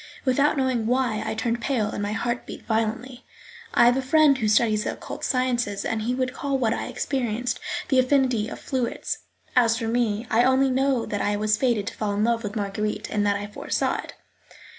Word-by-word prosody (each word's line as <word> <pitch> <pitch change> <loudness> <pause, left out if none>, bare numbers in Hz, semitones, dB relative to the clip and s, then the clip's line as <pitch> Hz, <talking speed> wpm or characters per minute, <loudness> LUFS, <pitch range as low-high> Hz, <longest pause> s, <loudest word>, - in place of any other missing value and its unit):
Without 280 +3 +3
knowing 255 -4 0
why, 245 -3 +1
I - - -3
turned 235 +1 -1
pale 235 -6 0
and - - -4
my 205 +1 -2
heart 240 +2 -2
beat - - -9
violently. 230 +3 -2 0.5
I 240 - +5
have 245 +2 +5
a - - +1
friend 290 +2 +4
who 225 -5 -1
studies 215 0 +3
the - - -2
occult - - -8
sciences, 245 -5 0
and 225 -1 -1
he 240 +3 -1
would 255 0 -1
call 275 0 -1
what 230 -4 +1
I - - -3
experienced 245 -2 -2 0.3
"the 265 - +4
affinity 255 -4 +2
of - - -7
fluids"; 255 -4 -3 0.4
as 230 -2 +4
for 225 -2 -3
me, 225 -1 0
I 230 +2 +4
only 260 +1 +3
know 265 -2 +1
that 205 - -3
I 205 - +1
was 215 +1 +2
fated 235 -3 +1
to - - -4
fall 205 -2 -2
in 205 - +1
love 230 0 +1
with 210 -1 -5
Marguerite, 210 +1 -3
and 210 -1 +1
that 200 - +2
I 205 0 -3
foresaw 205 - -2
it. - - -8
235 Hz, 210 wpm, -24 LUFS, 215-255 Hz, 0.5 s, I